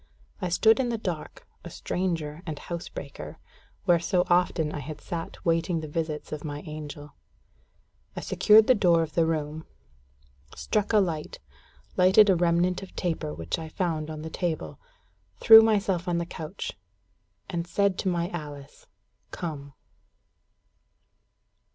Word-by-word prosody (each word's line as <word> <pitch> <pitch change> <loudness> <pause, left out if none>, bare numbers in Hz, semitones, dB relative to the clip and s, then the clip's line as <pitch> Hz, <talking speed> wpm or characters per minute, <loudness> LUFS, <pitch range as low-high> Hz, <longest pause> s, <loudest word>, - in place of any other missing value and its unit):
I 180 - -1
stood 220 +8 +4
in 255 -2 +1
the 235 - -1
dark, 180 -7 -6 0.2
a - - -8
stranger 165 -4 -3
and 155 -2 -4
housebreaker, 140 - -7 0.5
where 175 -1 +4
so 180 +1 +1
often 175 -3 +2
I 150 - -5
had 150 +2 -7
sat 170 +3 -7
waiting 165 +1 +1
the 155 - -6
visits 155 0 -4
of 155 -1 -5
my 145 -1 -5
angel. 150 -1 -8 1.0
I - - -4
secured 215 0 +5
the 255 - +6
door 175 -7 +3
of 155 -1 -7
the 165 0 +2
room, 155 -1 -2 0.9
struck 210 -1 -1
a 220 - +4
light, 170 -6 -1 0.6
lighted 190 +3 +6
a - - +4
remnant 175 +2 +1
of 195 - -11
taper 165 - -2
which 80 - -4
I 160 -1 -7
found 160 -3 -2
on 155 -1 -6
the 160 - -6
table, 160 - -3 0.6
threw 225 0 +10
myself 200 -5 +1
on 175 -1 +1
the 170 - -1
couch, 165 +2 -6 0.8
and 170 -1 -3
said 200 0 +1
to - - -2
my 170 -1 -1
Alice 145 -4 -9 0.4
"Come." 140 -4 -6
170 Hz, 145 wpm, -27 LUFS, 155-180 Hz, 1.0 s, threw